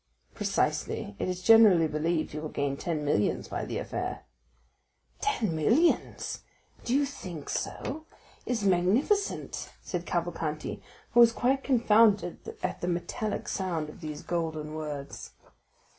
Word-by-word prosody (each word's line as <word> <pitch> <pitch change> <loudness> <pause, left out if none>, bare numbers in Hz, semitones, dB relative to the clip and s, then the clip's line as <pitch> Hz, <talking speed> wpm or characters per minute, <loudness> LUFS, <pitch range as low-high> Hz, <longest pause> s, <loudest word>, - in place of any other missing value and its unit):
"Precisely; 100 - -1
it - - -1
is 180 0 -4
generally 210 -7 +7
believed 155 +2 -1
he 150 - -4
will 155 0 -5
gain 140 -1 -1
ten 155 -1 -3
millions 105 -8 +1
by - - -3
that - - -3
affair." - - -4 1.0
"Ten 205 -8 0
millions! 235 - +2 0.4
Do 245 - 0
you 285 +1 +3
think 180 - -7
so? 315 +4 -4 0.4
It - - +1
is 225 -4 -2
magnificent!" 200 - +1
said 175 -1 -4
Cavalcanti, 165 -3 -2 0.3
who 240 - +4
was 235 -1 +9
quite 265 +3 +1
confounded 220 -7 +3
at 185 - -2
the 175 - -2
metallic 180 +4 -2
sound 170 -5 -2
of 175 - -12
these 150 -2 -6
golden 160 -3 -3
words. 150 -3 -6
175 Hz, 135 wpm, -29 LUFS, 155-225 Hz, 1.0 s, was